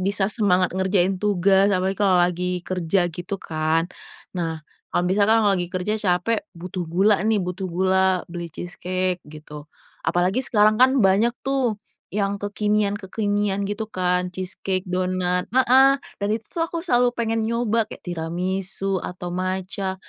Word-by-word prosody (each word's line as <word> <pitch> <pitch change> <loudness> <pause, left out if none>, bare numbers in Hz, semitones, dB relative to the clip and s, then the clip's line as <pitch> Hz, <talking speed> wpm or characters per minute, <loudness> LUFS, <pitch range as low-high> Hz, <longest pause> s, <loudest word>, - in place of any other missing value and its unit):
bisa 195 +1 +1
semangat 185 -5 +2
ngerjain 190 0 +1
tugas 195 -1 +3
apalagi 190 -1 0
kalau 195 -3 +4
lagi 180 +1 -1
kerja 180 0 0
gitu 175 +4 -5
kan. 160 +1 0 0.5
Nah, 165 -2 -2 0.3
kalau - - 0
misalkan 200 +4 +3
kalau 205 - +4
lagi 175 -1 -2
kerja 185 +3 -2
capek 185 +3 +1 0.2
butuh 180 +1 -5
gula 195 +5 +3
nih 220 0 +3
butuh 180 +1 -4
gula 190 +1 +2
beli 170 -1 -5
cheese 175 +2 -9
cake 185 0 -1
gitu, 150 -1 -11 0.4
apalagi 180 +7 +1
sekarang 215 -4 +3
kan 260 +1 +7
banyak 200 +5 +4
tuh 265 -5 0 0.3
yang 200 0 -2
kekinian-kekinian 205 -1 0
gitu 205 +2 -3
kan 180 -2 -1
cheese 185 0 -5
cake, 185 -1 0
donat, 180 0 0
heeh, 260 +1 +6 0.2
dan 200 - -2
itu 220 - -4
tuh 335 - -2
aku 335 0 -5
selalu 245 -7 +2
pengen 225 -1 -1
nyoba 230 -1 +1
kayak - - -11
tiramisu 185 +3 -2
atau 180 0 -6
matcha 185 +1 -2
190 Hz, 150 wpm, -23 LUFS, 180-210 Hz, 0.5 s, kan